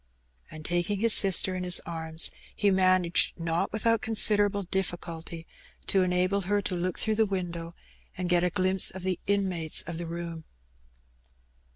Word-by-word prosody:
And, 155 -1 -11
taking 175 +4 -1
his 230 0 +5
sister 190 -1 +3
in 185 0 -4
his 180 -1 +3
arms, 160 -1 -1 0.2
he 205 -1 +1
managed, 185 -3 +2
not 165 0 -2
without 225 +1 0
considerable 205 -2 +3
difficulty, 170 -3 -5 0.4
to 195 - +2
enable 185 +2 0
her 205 +2 0
to 195 -1 -4
look 180 0 -3
Two 220 - -1
Visits. 215 -1 +1
67 185 -3 -3
through - - -11
the 170 - -6
window 165 +1 -11 0.4
and 180 0 -3
get 175 0 +2
a 180 - +2
glimpse 185 +1 +3
of 190 0 -10
the 185 -2 -2
inmates 185 -6 0
of 165 0 -7
the 170 - -5
room. 170 -1 -7
180 Hz, 175 wpm, -27 LUFS, 170-195 Hz, 0.4 s, his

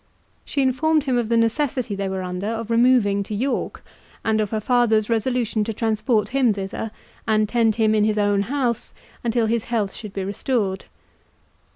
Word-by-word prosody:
She 280 - -1
informed 300 +4 +2
him 265 -3 0
of 235 -2 0
the 230 - +3
necessity 235 0 0
they 195 -1 -2
were 190 -1 -3
under 180 +2 -4
of 225 0 -3
removing 230 -4 +4
to 205 +1 -4
York, 260 +6 -2 0.4
and 220 -1 +2
of 210 - -1
her 220 - -1
father's 225 -2 +2
resolution 230 -1 0
to 225 - -3
transport 220 -1 0
him 255 -3 +2
thither, 195 +3 -4 0.4
and 215 -1 +2
tend 225 -1 +2
him 220 -1 +2
in 215 -1 +3
his 215 0 +1
own 205 -1 +2
house 250 -4 -1 0.3
until 235 -1 +1
his 225 0 0
health 215 -5 -1
should 210 -3 -9
be 195 - -3
restored. 200 -1 -2
225 Hz, 180 wpm, -22 LUFS, 210-245 Hz, 0.4 s, removing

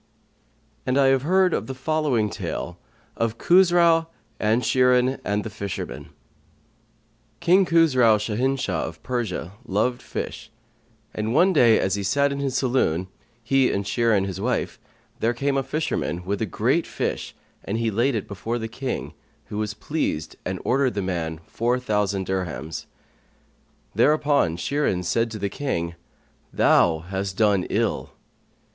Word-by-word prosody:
[FN#127] - - -40
And 130 +1 +2
I 140 - +5
have 135 -1 +3
heard 185 +4 +2
the 135 - -5
following 130 -6 0
tale 90 +1 -5 0.4
of 115 0 -1
KHUSRAU 170 -2 +4 0.3
AND 110 +3 +1
SHIRIN 125 0 +3
AND 105 +1 -1
THE - - -5
FISHERMAN 100 - -6 1.3
King 185 +3 +4
Khusrau[FN#128] 125 -10 +4
Shahinshah 135 +2 0
of - - -10
Persia 115 -9 -3
loved 120 +3 0
fish; - - -6 0.6
and 110 +3 -2
one 190 +2 +5
day, 120 -8 +5
as 95 - 0
he 100 - -1
sat 140 +8 +2
in 140 - -3
his 135 -2 -1
saloon, 95 - +1 0.3
he 135 +2 +3
and 100 0 -2
Shirin 110 -3 +2
his 95 -2 -5
wife, - - -1 0.4
there 115 +2 +1
came 140 +3 0
a 135 - +2
fisherman, 135 - -2
with 100 +2 -2
a 110 - 0
great - - +1
fish, - - -3 0.3
and 105 - -2
he 115 -1 0
laid 120 +5 +1
it 105 - -3
before 110 +4 -3
the 110 -1 -4
King, 125 +3 -4 0.4
who 105 - -4
was 105 -1 -2
pleased 125 - -3
and 95 0 -3
ordered 130 -3 +2
the 100 - -1
man 80 -4 -3
four 120 +2 0
thousand 105 -5 0
dirhams.[FN#129] 90 -4 -4 1.1
Thereupon 145 - +3
Shirin 120 -4 0
said 115 +6 +1
to 110 - -6
the 100 -1 -2
King, 85 -11 -3 0.6
"Thou 80 -2 +3
hast 95 0 -3
done 100 -4 +3
ill." - - -1
115 Hz, 150 wpm, -24 LUFS, 100-135 Hz, 1.3 s, I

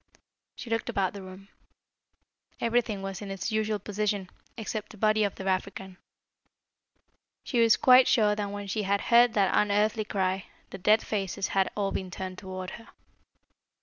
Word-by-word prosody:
She 235 - -9
looked 225 0 -1
about 190 -2 0
the 200 - -8
room. 190 +1 -12 1.1
Everything 230 -4 0
was 195 0 -5
in 205 - -7
its 195 +2 -4
usual 215 0 0
position, 205 -1 -3 0.3
except 215 -1 -5
the 215 - -13
body 215 +1 +2
of 200 - -1
the 190 - -8
African. 190 0 -3 1.5
She 245 - -1
was 225 -2 +5
quite 255 0 +6
sure 215 -4 +3
that 205 -1 -3
when 205 0 -6
she 205 +2 -2
had 200 0 +1
head 240 0 +4
that 195 -3 +2
unearthly 210 +1 +2
cry, 190 -2 -1 0.3
the 195 - -8
dead 210 +4 +3
faces 195 -2 -2
had 195 -1 +1
all 200 -1 0
been 185 - -4
turned 185 +1 -6
towards 185 -1 -7
her. - - -18
205 Hz, 165 wpm, -28 LUFS, 190-215 Hz, 1.5 s, quite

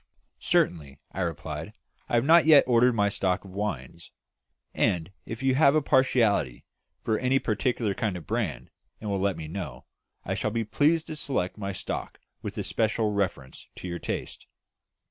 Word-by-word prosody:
"Certainly," 70 -5 0
I 95 - -4
replied. 85 -4 -4 0.4
"I - - +1
have 120 +2 +3
not 160 +1 +6
yet 150 -3 +8
ordered 125 0 +4
my 100 -2 +3
stock 95 -1 -1
of 95 - -11
wines, 90 -6 -5 0.6
and 85 +1 0 0.2
if 115 +3 -6
you 135 -1 +3
have 140 +1 +5
a 155 - +4
partiality 110 - +2 0.4
for 110 -1 0
any 130 +1 +2
particular 115 -2 0
kind 95 -1 -2
or - - -7
brand, 110 +7 -3 0.3
and 105 -2 -4
will 100 - 0
let 95 -2 0
me 80 -1 -6
know, 80 -8 -6 0.4
I - - -1
shall - - -1
be 115 +1 -1
pleased 155 +8 +2
to 155 - -6
select 130 -11 -2
my 100 -2 -4
stock 95 - -5 0.2
with - - -6
especial 110 -1 0
reference 90 -10 -3
to - - -7
your 85 -1 -4
taste." - - -5
105 Hz, 170 wpm, -27 LUFS, 90-125 Hz, 0.6 s, yet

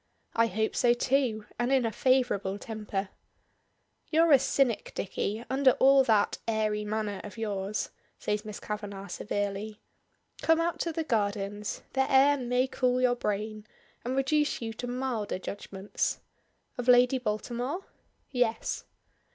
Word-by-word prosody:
"I 230 0 +3
hope 220 +1 -1
so 240 -1 +4
too 240 -4 +1
and 240 +2 +1
in 265 -3 +3
a 225 - 0
favorable 245 -7 +1
temper." 210 -3 -4 1.0
"You're 325 +1 +4
a 275 - +8
cynic, 270 -3 +1
Dicky, 210 +4 -3
under 265 0 +4
all 270 0 +6
that 215 -3 +2
airy 215 -1 0
manner 210 -2 -2
of 205 0 -9
yours," 205 -2 -2 0.3
says 210 0 -2
Miss 210 -2 -7
Kavanagh 205 -2 -6
severely. 205 +3 -3 0.6
"Come 325 0 +4
out 335 +1 0
to 335 - -1
the 325 0 -2
gardens, 205 -4 -2
the 265 +1 +1
air 275 +2 +6
may 250 -1 +1
cool 255 -1 +1
your 250 -1 +3
brain, 215 -1 -3 0.4
and 250 +2 -2
reduce 295 +3 +1
you 225 -1 -4
to 245 +3 -5
milder 245 -5 -2
judgments." 195 +1 -3 0.6
"Of 245 - -3
Lady 250 +1 +6
Baltimore?" 245 - -3 0.5
"Yes." 245 -4 0
230 Hz, 140 wpm, -29 LUFS, 210-260 Hz, 1.0 s, a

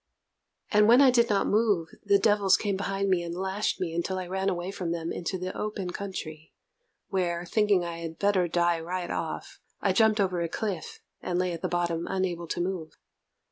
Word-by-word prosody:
And 210 0 +5
when 240 +3 +7
I 275 -2 +7
did 235 -1 +3
not 205 -2 +2
move, 205 -6 +2
the 200 - +4
devils 205 -2 +4
came 205 -2 -1
behind 195 0 -1
me 185 -2 +2
and 170 0 -5
lashed 190 +3 -1
me 170 -3 -2
until 170 +3 -1
I 185 - -3
ran 190 +2 -1
away 180 0 -3
from 180 -4 -3
them 170 -1 -3
into 180 +2 -3
the 185 +1 -5
open 205 -4 -3
country, 160 -6 -7 0.5
where, 175 -2 -1
thinking 205 -1 +2
I 170 -1 -5
had 165 -1 -6
better 200 -3 +2
die 170 0 +2
right 175 +2 -4
off, - - -4 0.2
I 195 - +1
jumped 220 +1 +4
over 180 -3 +1
a 170 - -1
cliff, 195 -3 -4 0.2
and 175 - -2
lay 180 -1 0
at 165 - -6
the 185 - 0
bottom 170 -1 -1
unable 180 -3 -2
to 175 - -3
move. 175 -3 -3
185 Hz, 200 wpm, -28 LUFS, 170-200 Hz, 0.5 s, when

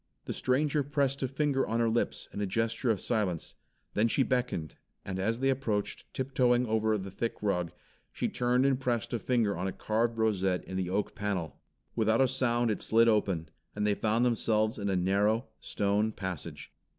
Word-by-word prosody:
The - - -3
stranger 145 +3 +1
pressed 140 -1 0
a 130 - +1
finger 135 0 0
on 115 +1 0
her 115 - +3
lips 115 +1 -1
in 105 - -4
a 100 - 0
gesture 115 +4 0
of 110 -4 +2
silence, 100 -8 -1 0.4
then 105 +2 +3
she 135 +4 +2
beckoned, 125 - -2 0.3
and 95 -1 -4
as 110 +5 0
they 135 0 +3
approached, 110 -6 -2
tiptoeing 125 -2 +2
over 110 -1 +1
the 95 -1 -6
thick 115 +4 -2
rug, 90 -5 0 0.4
she - - -2
turned 125 +2 +1
and 135 -2 +2
pressed 120 -4 -1
a 120 - 0
finger 115 -5 +1
on 90 +3 -2
a - - -1
carved 115 +4 -1
rosette 95 -5 +1
in 95 - -7
the 95 -1 -1
oak 100 +2 -1
panel. 95 -8 -3 0.3
Without 110 0 +2
a 135 - +5
sound 120 -2 +1
it 105 - -3
slid 115 +1 +4
open, 95 -8 +1 0.3
and 105 0 -1
they 105 - +3
found 110 +4 +1
themselves 110 -2 +1
in 100 0 -1
a 95 - +1
narrow, 100 +6 +2
stone 105 +2 0
passage. 95 -7 -6
110 Hz, 190 wpm, -30 LUFS, 100-125 Hz, 0.4 s, a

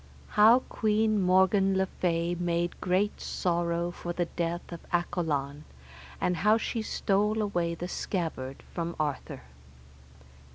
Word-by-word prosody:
How 225 +4 +6
Queen 215 -2 +1
Morgan 190 +1 +4
le 190 - +2
Fay 170 -2 -1
made 175 0 -1
great 190 +3 0
sorrow 170 -1 -1
for 175 0 -5
the 175 0 0
death 170 +1 -3
of 170 - -6
Accolon, 150 -5 -1 0.6
and 180 -1 0
how 210 +6 +4
she 230 0 -2
stole 210 0 0
away 175 -5 0
the 175 +1 -5
scabbard 160 -9 -4
from 170 -1 -3
Arthur. 145 - -3
175 Hz, 125 wpm, -29 LUFS, 170-200 Hz, 0.6 s, How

